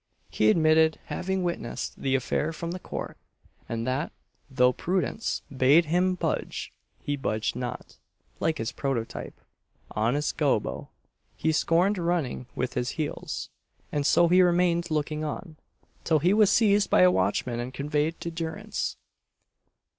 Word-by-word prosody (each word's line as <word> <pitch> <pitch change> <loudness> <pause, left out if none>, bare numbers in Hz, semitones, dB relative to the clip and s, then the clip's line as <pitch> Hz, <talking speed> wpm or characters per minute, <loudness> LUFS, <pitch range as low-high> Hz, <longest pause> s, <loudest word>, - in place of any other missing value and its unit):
He 110 - +3
admitted 160 +3 +4
having 190 0 -2
witnessed 150 -8 -4
the 135 -1 +1
affair 140 +4 0
from 165 +1 -5
the 185 - -5
court; - - -6 0.5
and 115 0 -2
that, 130 +4 -1 0.4
though 125 -2 +3
prudence 185 - -1
"bade 140 +6 +5
him 180 +4 +2
budge, - - -3 0.3
he 145 - -1
budged 110 -6 -2
not" 125 0 -6 0.4
like 160 -1 0
his 115 0 -3
prototype, 130 -5 -4 0.5
honest 120 +8 0
Gobbo, 140 -8 0 0.5
he 160 - +1
scorned 175 +5 +2
running 170 -8 -1
with 125 0 -2
his 125 +1 -2
heels, 155 -2 -4 0.4
and 145 - 0
so 170 +4 +5
he 180 +2 +5
remained 175 -1 +2
looking 155 0 -1
on, 155 +1 -5 0.5
till 160 - +3
he 175 +6 +3
was 210 -2 +5
seized 205 -2 +4
by - - +5
a 90 0 +7
watchman 100 +6 0
and 120 +1 -4
conveyed 150 +4 -1
to 170 - -4
durance. 170 +6 -4
155 Hz, 140 wpm, -27 LUFS, 130-175 Hz, 0.5 s, a